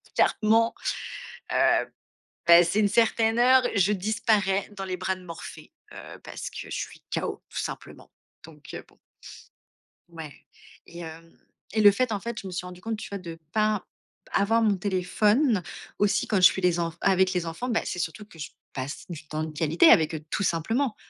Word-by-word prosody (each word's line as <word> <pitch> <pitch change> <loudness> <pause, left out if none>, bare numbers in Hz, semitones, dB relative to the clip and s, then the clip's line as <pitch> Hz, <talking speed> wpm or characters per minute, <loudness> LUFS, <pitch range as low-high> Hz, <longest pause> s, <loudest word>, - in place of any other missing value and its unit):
clairement, 225 +1 +3 0.8
heu, - - +3 0.6
passée 170 +4 +6
une 205 - +3
certaine 225 +1 +2
heure, 255 +1 +6
je 200 +1 +3
disparais 200 -1 0
dans 195 0 -5
les 185 -1 -3
bras 185 +1 -2
de 185 - -14
Morphée, 165 -2 -10 0.2
heu, - - -10
parce - - -6
que - - -14
je - - -3
suis - - -6
KO, - - -3
tout - - -6
simplement. - - -7 0.3
Donc, 150 -2 -15
heu, - - -6
bon. - - -25 1.1
Ouais 160 -4 -9 0.5
et 170 - -11
hem 165 0 -9 0.4
et 215 - +3
le 205 - +9
fait, 240 +4 0
en 205 - -1
fait, 235 +2 -6
je - - -10
me 185 - -6
suis 180 0 -4
rendue 180 0 -11
compte, 225 +1 -3
tu - - -7
vois, 200 - -4
de 170 -3 -9
pas 215 0 +2
b - - -22 0.5
avoir 225 +3 +2
mon 210 -3 +2
téléphone 205 - +1 0.4
aussi 205 -1 +2
quand 210 - +1
je - - +2
suis 190 - +6
les 175 -1 +2
enf 165 -1 -2
avec 190 -1 +3
les 180 -2 -1
enfants, 165 +10 -4
bah, 225 - +1
c'est - - -4
surtout 210 +4 -4
que 185 -6 -17
je 150 - -6 0.2
passe 135 +2 -5
du 150 -3 -8
temps 155 +1 -3
de 160 - -5
qualité 160 +2 +4
avec 160 0 +5
eux, 155 - -5
tout 200 - -1
simplement. 225 - 0
190 Hz, 195 wpm, -26 LUFS, 170-215 Hz, 1.1 s, le